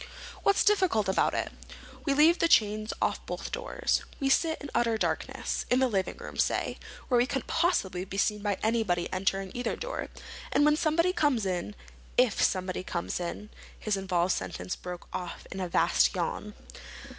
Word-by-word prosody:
"What's 400 - +3
difficult 375 - +3
about 190 - +2
it? - - -2 0.5
We 280 -3 +2
leave 320 +4 +5
the 335 - +4
chains 215 -6 +3
off - - 0
both - - -5
doors. - - -1 0.2
We 275 -2 +1
sit 320 +3 +2
in 285 - -8
utter 230 -2 +2
darkness—in 250 - -1
the 260 0 +4
living 195 -5 -1
room, - - -9
say, - - 0 0.3
where 245 -2 +3
we 245 - +3
couldn't 270 -2 -2
possibly 260 - +1
be 195 +1 -7
seen 210 +1 +1
by 205 -2 0
anybody 215 -6 +1
entering 195 0 0
either 245 -1 -2
door. - - -4 0.4
And 290 - +4
when 300 0 +5
somebody 335 +3 +2
comes 275 - +2
in—if 205 +5 -1
somebody 185 -1 +1
comes 170 -1 -3
in—" 180 +4 -5 0.3
His 215 -2 -1
involved 185 -2 +1
sentence - - -4
broke 180 -1 -8
off 175 -2 -5
in 190 - -5
a 185 -2 -2
vast 60 - +3
yawn. - - -3
215 Hz, 170 wpm, -29 LUFS, 190-290 Hz, 0.5 s, leave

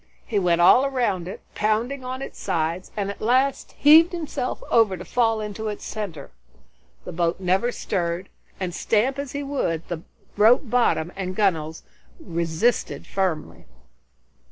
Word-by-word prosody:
He 215 -4 0
went 175 -2 +2
all 245 +9 +7
around 240 -10 0
it, 185 - -7
pounding 225 +6 0
its 260 +2 -6
sides, 170 -1 -2
and 200 -1 -1
at - - -12
last 260 +4 +1
heaved 320 +4 +6
himself 315 -6 -4
over 215 -5 +4
to 180 - -9
fall 225 -2 +1
into 215 +1 -5
its 210 -1 -5
center. 185 -10 -6 0.7
The - - -6
boat 170 +1 -1
never 190 +6 +1
stirred, 175 -4 -2 0.3
and 185 -2 -3
stamp 240 +9 +1
as 280 -2 -5
he 285 0 -3
would, 170 - -2
the 170 -3 -4 0.4
rope 225 +6 +6
bottom 225 -8 +1
and 185 -1 -4
gunwales 160 -6 0 0.4
resisted 170 +6 -1
firmly. 185 - -3
205 Hz, 145 wpm, -24 LUFS, 175-245 Hz, 0.7 s, all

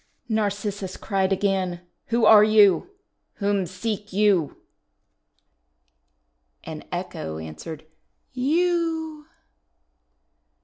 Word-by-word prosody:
'1 220 - -1
Narcissus 205 -2 -3
cried 195 -2 -1
again: 190 -2 0 0.3
"Who 230 -1 +2
are 210 -1 +8
you? 210 - +5 0.5
Whom 200 -3 0
seek 205 +3 -4
you?" 195 -6 +2 2.1
And - - -8
Echo 80 0 -5
answered, 80 - -8 0.5
"You!' 320 +2 -1
205 Hz, 80 wpm, -24 LUFS, 185-230 Hz, 2.1 s, are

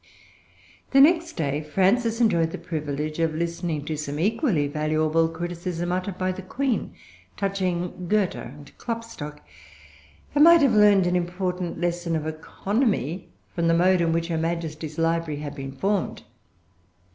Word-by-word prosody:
The 270 - +6
next 330 +3 +5
day 145 -2 -1
Frances 210 +9 +1
enjoyed 170 -9 +3
the - - -6
privilege 155 -1 -4
of 165 -1 +1
listening 170 -2 -2
to 155 - -2
some 145 -1 -4
equally 205 - +1
valuable 155 +2 +1
criticism 175 +1 -4
uttered 185 +1 -2
by 185 0 0
the 185 +1 -6
Queen 250 +6 -2 0.4
touching 185 -2 -2
Goethe 205 -1 +2
and 145 +3 -10
Klopstock, 230 -11 -6 0.9
and 295 - +5
might 335 -1 +8
have 265 -4 +4
learned 205 -3 +6
an 180 0 +1
important 180 0 -2
lesson 175 -1 -1
of 155 -1 -2
economy 185 - -1 0.2
from 170 -1 0
the 165 - +4
mode 180 +1 +4
in 165 -1 +2
which 165 +1 -1
her 165 -1 0
Majesty's 160 -2 -3
library 165 -2 0
had 145 -1 -5
been 135 -2 -6
formed. 195 +6 -1
170 Hz, 145 wpm, -25 LUFS, 155-195 Hz, 0.9 s, might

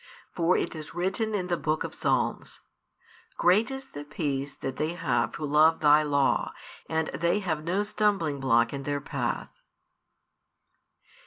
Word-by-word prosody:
For 175 +1 +2
it - - -2
is 155 0 -8
written 195 +5 -1
in 185 -3 -1
the 175 -1 -1
Book 155 0 -1
of - - -6
Psalms: - - -1 0.8
Great 205 +7 +4
is 270 0 -6
the 145 - -7
peace 145 -2 -3
that 135 -1 -5
they 155 +2 -1
have 125 -9 0
who 155 - -4
love 155 +2 +4
Thy 150 0 +6
law; 140 -2 +1 0.4
and 160 0 0
they 170 +7 0
have 160 -5 -2
no 180 +5 0
stumblingblock 150 - +1
in 140 - -4
their 145 +1 -2
path. - - -4
155 Hz, 150 wpm, -27 LUFS, 145-180 Hz, 0.8 s, Thy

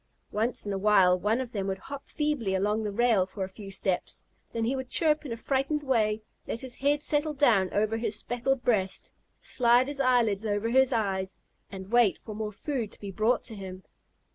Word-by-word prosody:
Once 225 +3 0
in 205 - -2
a 195 - -2
while 190 -3 +4
one 210 +6 +1
of 255 -2 -4
them 200 -4 -3
would 190 0 -2
hop 275 +7 -9
feebly 295 -11 -1
along 210 +3 0
the 210 - -2
rail 220 -3 +2
for 195 0 -5
a - - -3
few 195 +1 -10
steps. 190 -1 -2 0.3
Then 230 -1 -1
he 255 +4 0
would 260 -1 -5
chirp 305 -2 +2
in - - -7
a 230 - -3
frightened 275 +4 -1
way, 220 -5 +1 0.2
let 230 - -4
his 260 -2 -6
head 290 +3 0
settle 300 0 0
down 225 -10 +3
over 215 +2 0
his 225 -2 +1
speckled 245 +3 -1
breast, 195 -6 0 0.3
slide 250 - +3
his 285 -1 -3
eyelids 240 -6 +2
over 210 +1 -1
his 265 +2 +4
eyes, 195 -5 -1 0.3
and 190 +1 -9
wait 240 -5 +4
for 215 - -9
more 210 0 -4
food 235 0 -4
to - - -10
be 200 -1 -6
brought 220 +5 +1
to 230 - -8
him. 190 -2 -8
225 Hz, 210 wpm, -28 LUFS, 200-260 Hz, 0.3 s, while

